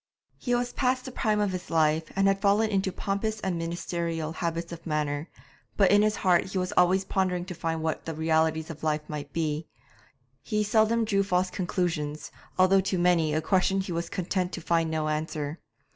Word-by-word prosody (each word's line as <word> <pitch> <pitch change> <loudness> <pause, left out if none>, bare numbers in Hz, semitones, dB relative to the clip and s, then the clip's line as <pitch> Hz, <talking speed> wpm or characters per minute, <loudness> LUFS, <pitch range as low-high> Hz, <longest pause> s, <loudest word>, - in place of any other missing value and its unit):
He 245 -2 0
was 245 0 -1
past 255 -1 0
the 260 - -6
prime 215 -3 0
of 185 -3 -2
life, 160 0 +2
and 195 0 +3
had 195 0 +2
fallen 210 +2 +3
into 195 -1 +1
pompous 210 +3 -2
and 185 -2 -1
ministerial 165 -1 -3
habits 170 0 -3
of 170 0 -8
manner, 150 0 -1 0.5
but 195 -3 +5
in 205 0 +6
his 215 0 +2
heart 180 -3 +3
he 190 0 -4
was 185 0 -1
always 185 +2 +4
pondering 185 -2 0
to 185 - -6
find 165 -1 -3
what 160 -1 -2
the 165 - -4
realities 160 0 +1
of 160 - -11
life 150 -1 -1
might 145 -2 -6
be; 155 -1 -2 0.7
he 210 0 0
seldom 220 +2 +3
drew 200 -2 +2
false 185 -1 +1
conclusions, 165 -5 -2 0.3
although 185 +1 +5
to 190 0 -1
many 170 -3 +3
a 155 - +1
question 190 0 +2
he 190 -1 -3
was 170 0 -2
content 185 -1 -1
to - - -3
find 165 -1 +1
no 155 -1 -1
answer. 155 0 -3
175 Hz, 190 wpm, -27 LUFS, 160-195 Hz, 0.7 s, in